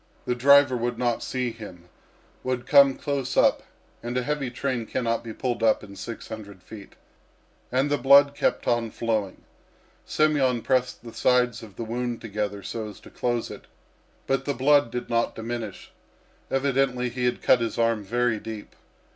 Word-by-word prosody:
The 125 Hz, -, 0 dB
driver 140 Hz, +1 st, +5 dB
would 120 Hz, 0 st, -2 dB
not 120 Hz, -1 st, 0 dB
see 125 Hz, -2 st, -2 dB
him 95 Hz, -6 st, -11 dB, 0.6 s
would 130 Hz, -1 st, -2 dB
come 140 Hz, -1 st, +6 dB
close 140 Hz, -2 st, -3 dB
up, -, -, +4 dB, 0.4 s
and 120 Hz, +2 st, -3 dB
a 125 Hz, -, 0 dB
heavy 145 Hz, -1 st, -2 dB
train 125 Hz, -2 st, -3 dB
cannot 115 Hz, -3 st, -1 dB
be 115 Hz, -, -7 dB
pulled 120 Hz, +1 st, -3 dB
up 110 Hz, -1 st, +3 dB
in 100 Hz, -1 st, -11 dB
six 115 Hz, +4 st, -7 dB
hundred 100 Hz, -4 st, -9 dB
feet. 105 Hz, -3 st, -12 dB, 0.8 s
And 135 Hz, +3 st, +1 dB
the 145 Hz, -, +1 dB
blood 140 Hz, +1 st, +6 dB
kept -, -, -1 dB
on 120 Hz, -1 st, +1 dB
flowing. 110 Hz, -4 st, -2 dB, 0.6 s
Semyon 140 Hz, -6 st, +2 dB
pressed 125 Hz, -2 st, 0 dB
the 115 Hz, -1 st, -10 dB
sides 125 Hz, -2 st, +2 dB
of 105 Hz, -4 st, -12 dB
the 115 Hz, -, -5 dB
wound 120 Hz, +1 st, -3 dB
together 105 Hz, -2 st, -4 dB
so 110 Hz, +3 st, -5 dB
as 105 Hz, -, -12 dB
to -, -, -15 dB
close 120 Hz, -1 st, -2 dB
it, -, -, -10 dB, 0.6 s
but 135 Hz, 0 st, 0 dB
the 140 Hz, -, -1 dB
blood 145 Hz, 0 st, +4 dB
did 125 Hz, +1 st, -5 dB
not 115 Hz, 0 st, 0 dB
diminish. 115 Hz, -2 st, -6 dB, 0.6 s
Evidently 135 Hz, -2 st, +1 dB
he 125 Hz, +1 st, -3 dB
had 125 Hz, -, -1 dB
cut 125 Hz, -, +5 dB
his 115 Hz, -, -2 dB
arm 115 Hz, -2 st, +1 dB
very 120 Hz, +1 st, 0 dB
deep. 110 Hz, -1 st, -8 dB
120 Hz, 170 wpm, -25 LUFS, 115-130 Hz, 0.8 s, come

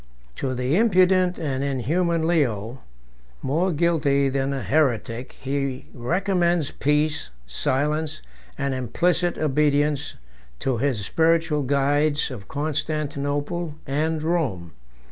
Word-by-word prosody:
To 130 Hz, -1 st, -2 dB
the 125 Hz, +4 st, 0 dB
impudent 185 Hz, -4 st, +4 dB
and 140 Hz, -4 st, -2 dB
inhuman 160 Hz, +5 st, 0 dB
Leo, 125 Hz, -7 st, 0 dB, 0.6 s
more 165 Hz, +8 st, +1 dB
guilty 150 Hz, -4 st, +2 dB
than 135 Hz, 0 st, -1 dB
a 135 Hz, -1 st, -3 dB
heretic, 125 Hz, -5 st, 0 dB
he 135 Hz, -1 st, -2 dB
recommends 175 Hz, +3 st, +1 dB
peace, 150 Hz, +2 st, 0 dB, 0.2 s
silence, 145 Hz, -, -1 dB, 0.3 s
and 140 Hz, -1 st, -1 dB
implicit 170 Hz, +8 st, 0 dB
obedience 150 Hz, -1 st, +1 dB, 0.5 s
to 130 Hz, -4 st, 0 dB
his 125 Hz, -6 st, 0 dB
spiritual 165 Hz, -, +2 dB
guides 145 Hz, +2 st, +1 dB
of 110 Hz, -6 st, -8 dB
Constantinople 150 Hz, +1 st, -2 dB
and 155 Hz, +3 st, -1 dB
Rome. 135 Hz, -, -1 dB
145 Hz, 105 wpm, -24 LUFS, 135-165 Hz, 0.6 s, impudent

